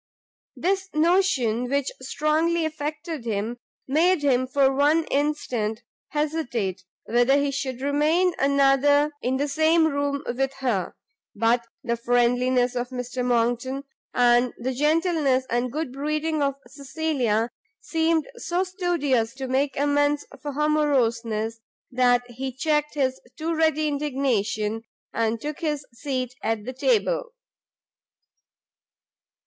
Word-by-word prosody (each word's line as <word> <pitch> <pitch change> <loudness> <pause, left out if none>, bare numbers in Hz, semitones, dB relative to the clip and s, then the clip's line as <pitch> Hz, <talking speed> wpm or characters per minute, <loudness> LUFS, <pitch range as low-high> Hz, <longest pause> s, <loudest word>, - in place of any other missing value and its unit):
This 385 +1 -1
notion, 305 - +2
which 280 0 0
strongly 315 +5 +1
affected 310 -1 -4
him, 225 +1 -2 0.3
made 320 +4 +3
him, 255 -2 +2
for 270 +1 +3
one 295 +4 +3
instant, 245 -6 -1 0.3
hesitate 245 - -2 0.2
whether 245 +4 +3
he 285 0 +1
should 260 -2 -4
remain 310 +6 +2
another 280 +1 +4
in 260 +1 0
the 285 +2 0
same 315 +3 +3
room 285 -1 -1
with 270 +2 -1
her: 245 -9 -2 0.4
but 230 +2 +2 0.2
the 235 -2 0
friendliness 245 +1 +2
of 245 0 -2
Mr 250 0 -4
Monckton, 245 +3 0 0.3
and 245 0 +3
the 255 +2 -2
gentleness 300 -2 +2
and 240 +1 0
good 305 -1 -3
breeding 305 +2 -1
of 275 -1 +1
Cecilia, 270 -6 -1 0.3
seemed 325 -1 0
so 360 -5 -1
studious 330 - 0
to 265 -1 -5
make 270 +1 0
amends 290 +1 +2 0.2
for 290 -1 -5
her 300 +2 +1
moroseness, 230 -7 +1 0.3
that 245 -1 +3
he 260 +2 -5
checked 300 +3 0
his 260 -2 0 0.2
too 330 +1 -2
ready 315 -1 +2
indignation, 250 -7 -1 0.3
and 225 0 0
took 300 +4 -5
his 295 -3 -2
seat 255 -1 -3
at 220 -1 -2
the 255 - -5
table. - - +1
275 Hz, 120 wpm, -24 LUFS, 245-305 Hz, 0.4 s, another